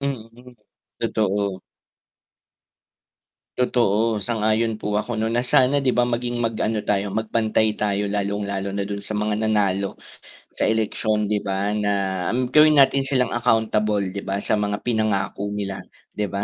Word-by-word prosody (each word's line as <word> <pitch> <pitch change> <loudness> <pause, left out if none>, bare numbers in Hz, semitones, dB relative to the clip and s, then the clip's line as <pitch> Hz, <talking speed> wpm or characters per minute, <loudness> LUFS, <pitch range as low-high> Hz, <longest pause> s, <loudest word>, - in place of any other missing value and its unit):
Hmm, 125 -2 -6 0.4
totoo. 100 -4 -1 2.0
Totoo, 115 -3 +1
sang-ayon 110 +1 0
po 105 -1 -4
ako 120 +1 -4
no 110 0 0
na 120 - +2
sana 130 +3 +3
diba 125 -2 +2
maging 120 0 -2
mag 115 -1 0
ano 110 -1 -1
tayo 100 0 0
mag 110 +2 -3
pantay 110 -1 +2
tayo 105 -1 0
lalong 100 0 -1
lalo 100 0 -3
na 100 0 -1
don 100 0 -4
sa 105 - -4
mga 105 0 0
nanalo, 100 -2 0 0.6
sa - - -1
eleksyon 110 -1 0
diba 100 -1 -1
na 105 -1 0 0.6
gawin 155 0 +7
natin 135 0 +4
silang, 130 -3 +1
accountable 110 -3 +1
di 100 - -3
ba? 100 +1 -3
Sa - - +1
mga 105 0 -2
pinangako 105 -3 -1
nila 100 -2 -4 0.3
di 105 - -2
ba? 100 0 -3
110 Hz, 145 wpm, -22 LUFS, 100-115 Hz, 2.0 s, gawin